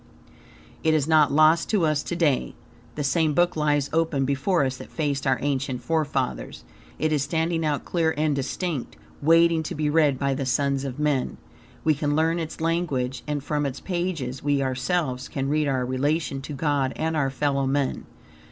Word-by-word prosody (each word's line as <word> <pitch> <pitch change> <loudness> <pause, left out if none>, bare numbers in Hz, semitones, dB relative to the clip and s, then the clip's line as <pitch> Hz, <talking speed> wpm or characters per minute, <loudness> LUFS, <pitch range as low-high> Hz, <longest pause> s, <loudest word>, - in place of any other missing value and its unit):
It 160 0 +3
is 150 -2 +1
not 155 -3 +5
lost 155 +3 +4
to 200 -6 +2
us 155 -2 +1
to 175 - -4
day. 150 -7 +1 0.4
The 150 - -2
same 155 +1 +1
book 175 0 +3
lies 145 -2 +1
open 160 -4 +1
before 140 +4 +1
us 130 -1 -2
that - - -10
faced 145 -3 -2
our 130 - +3
ancient 135 -3 -1
forefathers. 145 - -2 0.3
It 155 0 0
is 145 - +1
standing 165 +3 0
out 150 -2 -1
clear 165 -2 +1
and 150 -1 +1
distinct, 140 +1 -3 0.3
waiting 165 +2 +4
to 155 - -5
be 150 -1 0
read 150 -4 +3
by 140 +1 0
the 135 +1 -2
sons 140 +1 0
of 130 -1 -5
men. 150 -4 0 0.5
We 155 - +4
can 145 0 -1
learn 165 +2 +2
its 160 -1 -5
language, 150 -7 -1
and 145 -2 -2
from 150 0 -1
its 140 -1 -3
pages, 170 -8 -3
we 140 -1 +1
ourselves 130 0 -1
can 135 -1 -3
read 150 0 +1
our 130 -2 0
relation 140 +2 -1
to 150 - -7
God 140 -2 0
and 160 0 -1
our 140 -3 +1
fellowman. 140 0 -1
145 Hz, 180 wpm, -25 LUFS, 135-160 Hz, 0.5 s, not